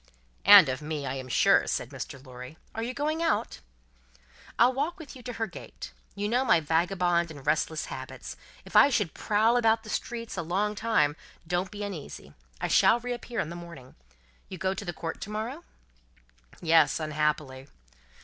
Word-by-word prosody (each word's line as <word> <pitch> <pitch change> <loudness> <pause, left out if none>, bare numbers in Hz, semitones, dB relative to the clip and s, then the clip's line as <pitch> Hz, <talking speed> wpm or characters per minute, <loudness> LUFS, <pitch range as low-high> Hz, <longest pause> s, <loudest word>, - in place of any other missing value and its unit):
"And 200 -5 +10
of 130 +2 -3
me, 150 -1 -4
I 130 - -2
am 130 -1 -6
sure," 125 - +4
said - - -2
Mr. 140 0 -8
Lorry. 125 +4 -10 0.2
"Are 225 - -4
you 235 +2 -2
going 300 +5 -2
out?" 330 -1 0 1.0
"I'll 245 +2 +5
walk 290 +6 -2
with 320 -5 -10
you 255 - -11
to 245 0 -6
her 225 0 -2
gate. 190 - -10 0.2
You 205 +1 -2
know 245 +4 +2
my 170 - +4
vagabond 170 +2 +1
and 145 -4 -11
restless 155 +1 0
habits. - - -8 0.3
If - - -12
I - - +8
should 210 - 0
prowl 220 +3 +2
about 225 -1 +3
the 215 - -8
streets 230 -3 -4
a - - 0
long 195 +6 -1
time, 210 -10 +1 0.3
don't 180 +2 -1
be 205 +2 -6
uneasy; 190 -8 -7 0.3
I - - -1
shall 235 - +5
reappear 240 -1 -5
in 150 - -4
the - - -6
morning. 170 -7 -11 0.6
You 185 - -7
go 190 +2 0
to 190 - -6
the 175 - -2
Court 165 -1 -6
to - - -6
morrow?" 230 +10 -4 1.0
"Yes, 160 -2 +4
unhappily." 150 -3 -2
185 Hz, 180 wpm, -28 LUFS, 155-230 Hz, 1.0 s, And